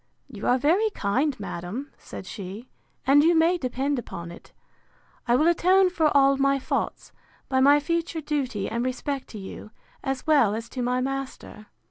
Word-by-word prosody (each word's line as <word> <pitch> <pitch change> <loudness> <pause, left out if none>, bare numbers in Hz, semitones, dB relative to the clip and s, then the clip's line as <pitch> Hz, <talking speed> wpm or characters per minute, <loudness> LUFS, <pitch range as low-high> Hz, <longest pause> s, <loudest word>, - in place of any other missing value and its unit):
You 215 -6 -6
are 250 - +4
very 345 - +2
kind, 255 +7 0
madam, 200 +8 -6
said - - -10
she; 200 +5 -8 0.4
and 280 +3 +6
you 335 +2 +4
may 335 +2 +3
depend 265 +1 -1
upon 170 -7 -7
it, 170 - -14 0.8
I 240 - +4
will 300 - +3
atone 365 +2 +4
for 325 -3 +2
all 275 0 +5
my 275 0 +2
faults, 265 - -3 0.4
by 260 -1 +2
my 285 +2 +6
future 335 +2 -2
duty 275 -9 -2
and 235 +1 -2
respect 265 +2 -3
to 220 - -9
you, 195 +1 -9 0.3
as 270 -2 -3
well 280 -10 +4
as 230 +1 -6
to 255 - -5
my 250 +1 0
master. 270 -5 -5
270 Hz, 170 wpm, -25 LUFS, 235-300 Hz, 0.8 s, and